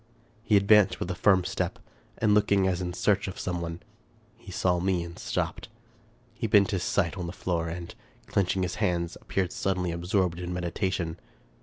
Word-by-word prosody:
He 110 Hz, -2 st, +4 dB
advanced 100 Hz, 0 st, +5 dB
with 90 Hz, -, -2 dB
a -, -, -1 dB
firm 95 Hz, 0 st, +3 dB
step, -, -, -2 dB, 0.4 s
and 110 Hz, -2 st, +3 dB
looking 100 Hz, -2 st, +3 dB
as 90 Hz, -1 st, 0 dB
in 90 Hz, -1 st, -2 dB
search 100 Hz, +2 st, +1 dB
of 95 Hz, -, -6 dB
some 90 Hz, -2 st, -2 dB
one. 85 Hz, 0 st, -5 dB, 0.5 s
He 95 Hz, -, -12 dB
saw 90 Hz, 0 st, +1 dB
me 90 Hz, -1 st, +1 dB
and 85 Hz, 0 st, -9 dB
stopped. -, -, -3 dB, 0.6 s
He -, -, -3 dB
bent 100 Hz, 0 st, +5 dB
his 95 Hz, -3 st, -1 dB
sight 85 Hz, +1 st, 0 dB
on 90 Hz, -, -3 dB
the -, -, -4 dB
floor, 85 Hz, -2 st, -2 dB
and, 85 Hz, +1 st, -6 dB, 0.3 s
clenching 95 Hz, -1 st, 0 dB
his 90 Hz, -, -2 dB
hands, 85 Hz, -4 st, 0 dB
appeared 95 Hz, -2 st, -1 dB
suddenly 90 Hz, -2 st, -1 dB
absorbed 90 Hz, +1 st, 0 dB
in 90 Hz, 0 st, -4 dB
meditation. 90 Hz, -1 st, -2 dB
90 Hz, 180 wpm, -28 LUFS, 85-100 Hz, 0.6 s, advanced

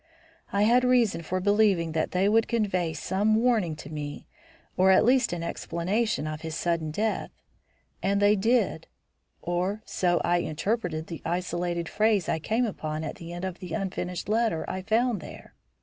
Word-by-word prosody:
I 200 Hz, +1 st, +2 dB
had 240 Hz, +4 st, +4 dB
reason 245 Hz, -8 st, +3 dB
for 185 Hz, +3 st, -2 dB
believing 200 Hz, -4 st, +3 dB
that 160 Hz, 0 st, 0 dB
they 185 Hz, +2 st, +1 dB
would 225 Hz, +2 st, +3 dB
convey 195 Hz, -7 st, 0 dB
some 200 Hz, +7 st, +1 dB
warning 220 Hz, -8 st, +2 dB
to -, -, -10 dB
me 145 Hz, -1 st, -6 dB, 0.5 s
or 185 Hz, +1 st, +4 dB
at 190 Hz, -, +6 dB
least 250 Hz, 0 st, +3 dB
an 175 Hz, -1 st, -3 dB
explanation 185 Hz, +4 st, -1 dB
of 155 Hz, 0 st, -5 dB
his 160 Hz, -1 st, -5 dB
sudden 170 Hz, -2 st, -1 dB
death. 215 Hz, +8 st, -1 dB, 0.7 s
And 200 Hz, +1 st, +1 dB
they 205 Hz, +1 st, +5 dB
did, 230 Hz, +5 st, +1 dB, 0.6 s
or 185 Hz, +5 st, -1 dB
so 175 Hz, -1 st, +1 dB
I 175 Hz, +1 st, +2 dB
interpreted 170 Hz, -1 st, -2 dB
the 165 Hz, -2 st, -8 dB
isolated 175 Hz, -1 st, -2 dB
phrase 210 Hz, -3 st, +2 dB
I 160 Hz, -, 0 dB
came 225 Hz, +9 st, 0 dB
upon 155 Hz, -7 st, -4 dB
at 155 Hz, -, -5 dB
the 170 Hz, 0 st, -9 dB
end 175 Hz, +2 st, -5 dB
of 185 Hz, -1 st, -5 dB
the 180 Hz, -3 st, -7 dB
unfinished 180 Hz, -3 st, -3 dB
letter 220 Hz, -5 st, 0 dB
I 185 Hz, -, -3 dB
found 225 Hz, +1 st, +1 dB
there. -, -, -11 dB
185 Hz, 170 wpm, -27 LUFS, 170-220 Hz, 0.7 s, at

